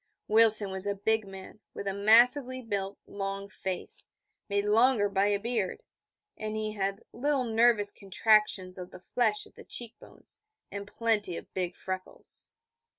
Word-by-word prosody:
Wilson 215 -2 +5
was 190 +1 -2
a 200 - -1
big 220 +1 0
man, 195 +2 -11 0.2
with - - -6
a 195 - -1
massively 245 +6 +4
built, 200 -4 -4
long 195 0 -5
face, 190 -2 +2 0.4
made 200 0 0
longer 220 0 +3
by 200 0 +1
a 205 -1 +1
beard, 220 -3 -3 0.5
and 215 0 -5
he 215 0 -3
had 195 0 -3
little 280 0 0
nervous 225 -3 +2
contractions 195 -2 +1
of 180 0 -8
the - - -12
flesh 215 +2 0
at - - -18
the - - -14
cheek 235 -2 -5
bones, - - -15 0.3
and 200 0 -6
plenty 210 -5 -1
of - - -11
big 180 -1 -3
freckles. 185 0 -8
205 Hz, 155 wpm, -29 LUFS, 195-225 Hz, 0.5 s, Wilson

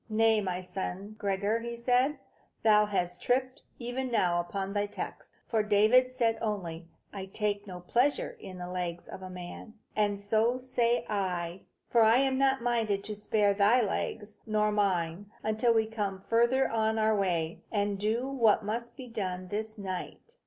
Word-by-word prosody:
"Nay, 220 0 +3
my 185 -2 -2
son 190 +2 -5
Gregor," 205 +3 0
said 250 +4 +2
he, - - -19 0.5
"thou 210 -1 +5
hast 180 -3 -2
tripped, 255 +1 0 0.2
even 250 +2 -3
now, 180 -7 +2
upon 190 +3 -3
thy 205 0 0
text. 205 - -7 0.2
For 220 -2 +2
David 215 +5 +4
said 230 -3 +1
only, 175 -6 -3 0.3
'I 195 -2 -6
take 205 +1 -2
no 180 -2 -7
pleasure 285 - +1
in 185 - -9
the 180 0 -6
legs 180 -1 -4
of - - -9
a 185 - -7
man.' 180 +5 -9 0.2
And 205 -1 +1
so 220 +4 +2
say 245 -2 +1
I, 180 -3 -2 0.3
for 235 - +3
I 225 +2 +6
am 265 0 +2
not 270 -3 +2
minded 225 -5 +1
to 210 - -5
spare 205 0 +2
thy 205 +5 +4
legs 210 0 -3
or 210 0 +3
mine, 195 -2 0
until 220 +2 +2
we 220 0 +3
come 205 -3 -3
farther 235 +6 +2
on 220 0 0
our 220 0 +3
way, 170 -5 -1
and 205 -2 0
do 225 +5 0
what 230 -6 +3
must 235 +3 -4
be 260 - -7
done 185 -6 -4
this 215 +2 -4
night. 195 - -6
210 Hz, 170 wpm, -30 LUFS, 195-235 Hz, 0.5 s, I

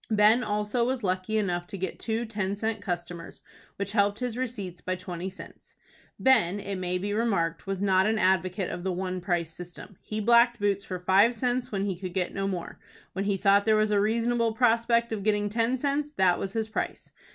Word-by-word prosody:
Ben 215 +3 +5
also 210 +2 0
was 250 0 -1
lucky 185 +3 -1
enough 175 -4 -1
to 200 - -6
get 190 +1 -4
two 225 +1 -1
ten 205 -3 -2
cent 220 0 -2
customers, 175 -2 -5 0.3
which 200 0 -1
helped 205 0 +2
his 245 -2 -2
receipts 225 -8 -4
by 185 +1 -2
twenty 180 0 -5
cents. 190 - -13 0.4
Ben, 205 -8 +3
it 195 -1 -4
may 180 0 -1
be 205 +3 -3
remarked, 195 -7 0
was 195 0 -2
not 190 0 +3
an 220 0 +1
advocate 185 -1 +1
of 175 - -5
the 190 - -1
one 185 0 -3
price 175 -2 -1
system. 175 +3 -10
He 215 - -5
blacked 235 +2 +4
boots 200 -1 +1
for 185 - -5
five 195 +6 +4
cents 245 +1 -1
when 200 -1 -1
he 195 -2 -1
could 180 0 -7
get 185 -2 -1
no 195 0 -2
more. 180 -3 -5 0.3
When 195 +2 -2
he 200 -1 +1
thought 200 +2 +3
there 220 - +5
was 215 0 +2
a 205 -1 +3
reasonable 230 +1 +1
prospect 235 0 +2
of 215 -2 -2
getting 205 0 +1
ten 230 +4 +1
cents, 285 +2 -1
that 185 -8 +3
was 195 0 -4
his 220 -1 -1
price. 220 - -4
205 Hz, 210 wpm, -27 LUFS, 185-225 Hz, 0.4 s, Ben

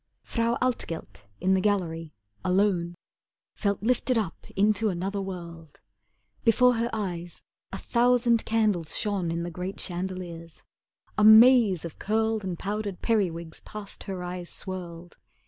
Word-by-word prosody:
Frau 230 0 0
Altgelt 160 - -3
in 190 +1 +2
the 190 - +3
gallery, 165 -6 -1 0.3
alone, 180 -2 +1 0.6
Felt 200 -1 -1
lifted 250 +1 +1
up 200 -7 -3
into 210 +2 +2
another 195 +2 -2
world. 170 -5 -8 0.6
Before 250 +2 +5
her 235 +1 0
eyes 175 -5 -5 0.3
a - - -4
thousand 240 -1 +2
candles 210 -8 +1
shone 200 -5 -1
In 170 +1 -2
the 175 - -5
great 180 +4 -5
chandeliers. 175 -3 -5 0.6
A - - +4
maze 220 - +7
of 170 - -8
curled 220 0 0
And 185 -2 -3
powdered 205 -1 -4
periwigs 170 -8 -1
past 210 -2 -10
her 190 -2 -5
eyes 180 -1 -6
swirled. 175 -2 -6
190 Hz, 130 wpm, -27 LUFS, 175-220 Hz, 0.6 s, maze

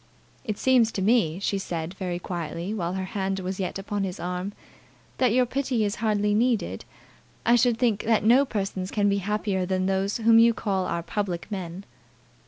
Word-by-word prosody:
"It 215 -5 -3
seems 250 -4 +3
to 195 - -2
me," 200 -7 +3
she 200 0 -1
said, 170 -2 -4
very 185 -2 -3
quietly, 175 +2 -4
while 180 -4 -2
her 190 0 -2
hand 195 -1 -1
was 185 +1 -4
yet 185 -1 -2
upon 200 +1 -3
his 185 -1 -4
arm, 180 +2 -3 0.7
"that 255 -3 +3
your 250 +2 +3
pity 255 -3 0
is 205 - -2
hardly 210 -2 +1
needed. 230 +1 0 0.6
I 240 - +5
should 240 -1 +3
think 230 -4 +1
that 220 -2 +2
no 245 +6 +6
persons 195 -6 -3
can 205 -1 +1
be 200 0 +1
happier 200 -1 -1
than 185 0 0
those 195 +1 0
whom 225 0 +5
you 230 0 +5
call 190 -4 -1
our 170 0 -2
public 180 +1 -3
men." 185 -1 -5
200 Hz, 190 wpm, -26 LUFS, 185-225 Hz, 0.7 s, no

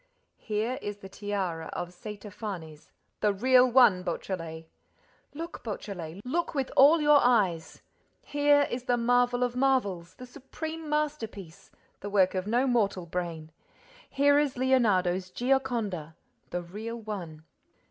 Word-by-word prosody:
Here 220 +4 -2
is 205 0 -5
the 195 -1 -11
tiara 190 -5 -3
of 175 - -4
Saitapharnes, 200 -6 -8 0.3
the 210 - +2
real 250 +5 +4
one, 240 -7 +5
Beautrelet! 165 -2 -5 0.7
Look, 335 +3 -7
Beautrelet, 195 -5 -6
look 335 +5 -2
with 270 -2 -1
all 300 +4 +7
your 295 -1 +6
eyes: 195 -10 +1 0.4
here 290 0 +3
is 245 +1 -4
the 245 -1 +2
marvel 245 +1 +2
of 245 0 -1
marvels, 225 -10 0
the 250 - -10
supreme 315 +5 -7
masterpiece, 225 - -3 0.3
the 205 - -6
work 190 -2 +3
of 185 +1 -3
no 240 +4 +2
mortal 205 -8 +1
brain; 165 -2 -5 0.6
here 285 +1 +4
is 290 -4 -1
Leonardo's 195 -8 +2
Gioconda, 230 - -1 0.3
the 175 0 -3
real 220 +7 -6
one! 180 -8 -7
215 Hz, 130 wpm, -28 LUFS, 180-255 Hz, 0.7 s, all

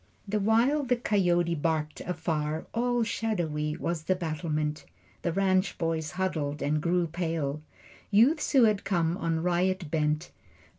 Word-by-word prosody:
The 210 +1 0
while 230 +8 +3
the 255 -2 +1
coyote 175 -7 +1
barked 155 -1 -1
afar 160 -3 -2
All 245 0 +1
shadowy 170 -10 -2
was 165 -2 -3
the 185 - +2
battlement. 155 -3 -2 0.4
The 170 - -1
ranch 185 +1 +1
boys 165 -2 -1
huddled 155 -6 -2
and 150 +1 +1
grew 175 +2 +1
pale, 160 -3 -2 0.5
Youths 255 +12 +3
who 265 -3 +6
had 210 -3 +3
come 170 -3 +1
on 165 -2 -1
riot 180 -1 0
bent. 150 -1 0
170 Hz, 140 wpm, -28 LUFS, 155-195 Hz, 0.5 s, who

